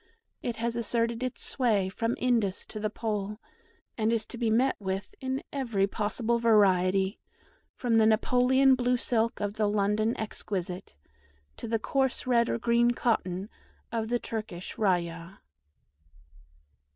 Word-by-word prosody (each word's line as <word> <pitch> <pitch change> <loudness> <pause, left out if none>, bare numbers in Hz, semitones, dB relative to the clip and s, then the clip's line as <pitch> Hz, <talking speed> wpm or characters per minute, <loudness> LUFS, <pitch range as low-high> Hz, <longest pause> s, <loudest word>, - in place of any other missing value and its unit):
It 240 - -3
has 230 +1 -2
asserted 235 0 0
its 255 -1 -3
sway 220 -8 +1
from 230 +5 -2
Indus 230 -6 +1
to 215 - -8
the 215 0 -1
Pole, 210 -2 -3 0.6
and 220 +1 +2
is 225 -1 +1
to 240 - -10
be 235 -2 +1
met 245 +5 +3
with 195 -1 -4
in 265 0 -2
every 230 -8 +1
possible 220 +3 -1
variety, 195 -3 +3 0.6
from 235 -3 +1
the 220 -1 +5
Napoleon 250 +4 +4
blue 250 0 +2
silk 230 -1 0
of 205 -1 -2
the 210 -1 +2
London 210 +2 +1
exquisite, 190 - -5 0.6
to - - -6
the 225 0 +1
coarse 265 +3 -1
red 235 -2 +3
or - - 0
green 235 +1 +3
cotton 200 -6 0 0.4
of 225 -1 -2
the 240 - +2
Turkish 215 -7 -6
rayah. 175 -2 -1
225 Hz, 140 wpm, -28 LUFS, 200-240 Hz, 0.6 s, the